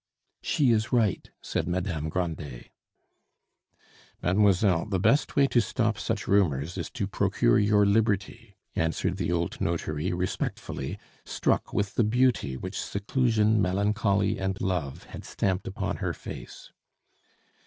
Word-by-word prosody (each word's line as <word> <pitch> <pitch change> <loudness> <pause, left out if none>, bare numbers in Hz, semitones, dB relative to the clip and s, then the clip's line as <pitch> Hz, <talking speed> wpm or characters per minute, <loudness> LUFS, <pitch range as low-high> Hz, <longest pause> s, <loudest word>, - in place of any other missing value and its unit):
"She 135 -5 +2
is 110 -1 +1
right," 110 -7 +1
said - - -2
Madame 85 -4 -2
Grandet. 80 -7 -4 1.5
"Mademoiselle, 95 -1 +3
the 100 -3 0
best 115 - +2
way 140 - +5
to 120 - +4
stop 110 -2 -1
such 110 -3 -2
rumors 85 -5 +2
is - - -4
to - - -3
procure - - +2
your 105 0 +4
liberty," 100 0 0 0.2
answered 80 +3 0
the 85 -3 -1
old 85 -1 -2
notary 80 0 -1
respectfully, 90 +1 -3 0.3
struck - - 0
with 100 -1 -1
the 120 - +2
beauty 115 - +1
which 90 +7 -5
seclusion, 110 0 +1
melancholy, 100 +1 +1
and 95 0 -2
love 85 -8 -2
had - - -10
stamped 95 -1 -2
upon 95 - -3
her - - -2
face. - - -9
100 Hz, 130 wpm, -27 LUFS, 85-110 Hz, 1.5 s, way